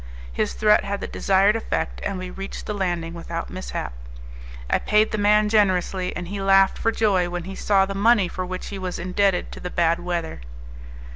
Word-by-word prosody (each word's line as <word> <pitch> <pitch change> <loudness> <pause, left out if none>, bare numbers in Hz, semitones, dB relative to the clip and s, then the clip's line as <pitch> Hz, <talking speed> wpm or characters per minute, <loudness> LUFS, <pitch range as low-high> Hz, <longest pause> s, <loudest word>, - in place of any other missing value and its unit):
His - - -1
threat 210 -1 +4
had 200 0 -3
the - - -4
desired 195 +2 +2
effect, 225 - -3
and 200 - -2
we 185 0 -6
reached 195 +1 -7
the 210 - -3
landing 175 -4 -2
without 170 0 -6
mishap. 185 - -5 0.7
I - - +2
paid 210 +1 +2
the 215 - -2
man 210 +1 +4
generously, 190 -3 +1
and 175 0 -5
he 200 0 -4
laughed 195 0 +4
for 225 - +1
joy 195 -6 +1
when 175 0 -4
he 190 +2 -7
saw 195 0 +2
the 195 - -5
money 205 -1 +4
for 185 +1 -4
which 185 0 -5
he 200 - -6
was 185 -1 -4
indebted 185 +1 0
to - - -9
the 180 - -5
bad 170 -1 +1
weather. 170 - -4
190 Hz, 200 wpm, -23 LUFS, 180-205 Hz, 0.7 s, threat